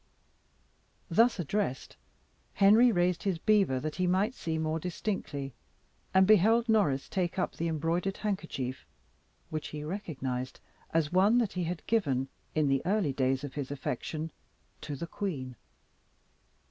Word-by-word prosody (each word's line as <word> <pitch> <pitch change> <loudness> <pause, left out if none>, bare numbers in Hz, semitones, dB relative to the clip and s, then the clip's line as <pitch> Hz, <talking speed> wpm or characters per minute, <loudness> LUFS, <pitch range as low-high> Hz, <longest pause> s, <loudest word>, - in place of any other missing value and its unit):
Thus 230 0 +4
addressed, 175 -4 -2 0.6
Henry 220 +5 +6
raised 175 -3 +1
his 195 -4 0
beaver, 195 -8 +3
that 155 +3 -4
he 185 -1 +1
might 195 +6 +2
see 160 -9 -3
more 160 0 -1
distinctly, 160 - -4 0.6
and 190 0 +5
beheld 220 +4 +5
Norris 195 -12 +2
take 180 -2 -2
up 185 - 0
the 170 - -2
embroidered 165 +4 -1
handkerchief, 165 -11 -3 0.6
which 155 -1 -3
he 150 -1 -6
recognised 135 -8 -4 0.3
as 160 -2 +1
one 200 +6 +5
that 230 -5 +1
he 180 -2 -1
had 170 0 -4
given, 135 - +1 0.3
in 155 -2 +3
the 135 -1 +2
early 185 -5 +1
days 130 0 0
of 145 - -6
his 140 -3 -4
affection, 150 +3 -4 0.5
to 150 -2 -5
the 155 - -5
queen. 150 - -4
170 Hz, 140 wpm, -30 LUFS, 145-195 Hz, 0.6 s, Henry